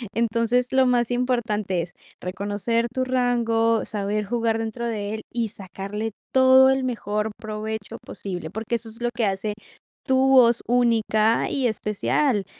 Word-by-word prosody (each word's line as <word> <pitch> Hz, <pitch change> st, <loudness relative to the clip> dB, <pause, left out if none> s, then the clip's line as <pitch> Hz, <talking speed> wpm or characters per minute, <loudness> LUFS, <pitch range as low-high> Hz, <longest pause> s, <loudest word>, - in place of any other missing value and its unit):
Entonces, 235 Hz, +2 st, +1 dB
lo 265 Hz, 0 st, +5 dB
más 245 Hz, -1 st, +2 dB
importante 220 Hz, -7 st, 0 dB
es 175 Hz, -, -9 dB, 0.3 s
reconocer 205 Hz, +5 st, -1 dB
tu 260 Hz, -, 0 dB
rango, 235 Hz, -3 st, +1 dB
saber 210 Hz, 0 st, -2 dB
jugar 230 Hz, 0 st, 0 dB
dentro 225 Hz, +1 st, -3 dB
de 210 Hz, -2 st, -3 dB
él 220 Hz, -, -4 dB
y 235 Hz, -2 st, -1 dB
sacarle 200 Hz, +2 st, -5 dB, 0.2 s
todo 260 Hz, 0 st, +7 dB
el 265 Hz, 0 st, 0 dB
mejor 215 Hz, -3 st, -2 dB
provecho 215 Hz, -1 st, -5 dB
posible, 180 Hz, -5 st, -5 dB
porque 220 Hz, +4 st, -3 dB
eso 225 Hz, 0 st, -5 dB
es 225 Hz, +2 st, -8 dB
lo 240 Hz, -, +2 dB
que 230 Hz, -, +1 dB
hace 195 Hz, +2 st, -2 dB, 0.5 s
tu 260 Hz, 0 st, +3 dB
voz 240 Hz, -3 st, +6 dB
única 230 Hz, -2 st, +2 dB
y 265 Hz, -3 st, +1 dB
especial. 210 Hz, +1 st, 0 dB
225 Hz, 150 wpm, -24 LUFS, 210-245 Hz, 0.5 s, todo